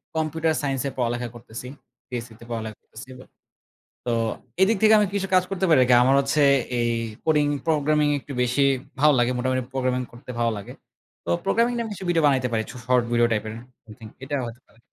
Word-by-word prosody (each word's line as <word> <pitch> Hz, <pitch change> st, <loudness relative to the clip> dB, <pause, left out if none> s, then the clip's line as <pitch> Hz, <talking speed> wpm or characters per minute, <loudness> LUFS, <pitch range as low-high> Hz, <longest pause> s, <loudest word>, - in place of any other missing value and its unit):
Computer 160 Hz, 0 st, 0 dB
science 135 Hz, -2 st, -1 dB
এ -, -, -9 dB
পড়ালেখা 120 Hz, 0 st, -1 dB
করতেছি। 120 Hz, +1 st, -9 dB, 0.4 s
PSCতে 115 Hz, -2 st, -7 dB
পড়ালেখা 110 Hz, -2 st, -5 dB
করতেছি 115 Hz, +4 st, -12 dB
এবার। 130 Hz, 0 st, -13 dB, 0.8 s
তো 120 Hz, -, 0 dB, 0.5 s
এদিক 205 Hz, +3 st, +4 dB
থেকে 220 Hz, 0 st, +6 dB
আমি 210 Hz, -, +3 dB
কিছু 195 Hz, -1 st, -1 dB
কাজ 185 Hz, -1 st, +5 dB
করতে 195 Hz, -1 st, -1 dB
পারি 155 Hz, -, +6 dB
আরকি, 125 Hz, 0 st, +4 dB
আমার 135 Hz, +2 st, +4 dB
হচ্ছে 140 Hz, +2 st, 0 dB, 0.4 s
এই 120 Hz, 0 st, +1 dB, 0.3 s
কোডিং 150 Hz, -2 st, +3 dB, 0.2 s
প্রোগ্রামিং 150 Hz, -1 st, +2 dB
একটু 140 Hz, -, -11 dB
বেশি 125 Hz, +3 st, 0 dB, 0.4 s
ভালো 150 Hz, +1 st, +5 dB
লাগে। 120 Hz, +1 st, +2 dB
মোটামুটি 130 Hz, +1 st, 0 dB
প্রোগ্রামিং 130 Hz, -1 st, 0 dB
করতে 120 Hz, +1 st, -15 dB
ভালো 115 Hz, -1 st, +2 dB
লাগে। 100 Hz, -, -9 dB, 0.5 s
তো -, -, -5 dB, 0.2 s
প্রোগ্রামিংটা 235 Hz, +1 st, +1 dB
আমি 225 Hz, -, -6 dB
কিছু 190 Hz, -1 st, -8 dB
ভিডিও 165 Hz, -2 st, +2 dB
বানাইতে 130 Hz, -3 st, +2 dB
পারি। 110 Hz, -1 st, 0 dB
চ -, -, -8 dB
শর্ট 125 Hz, -1 st, +3 dB
ভিডিও 120 Hz, 0 st, +4 dB
টাইপের 110 Hz, 0 st, -1 dB, 0.3 s
এভ্রিথিং 110 Hz, 0 st, -12 dB, 0.2 s
এটা 140 Hz, +2 st, -3 dB
হয়তো 115 Hz, +1 st, -8 dB
পারে। 115 Hz, -, -26 dB
130 Hz, 190 wpm, -24 LUFS, 120-155 Hz, 0.8 s, থেকে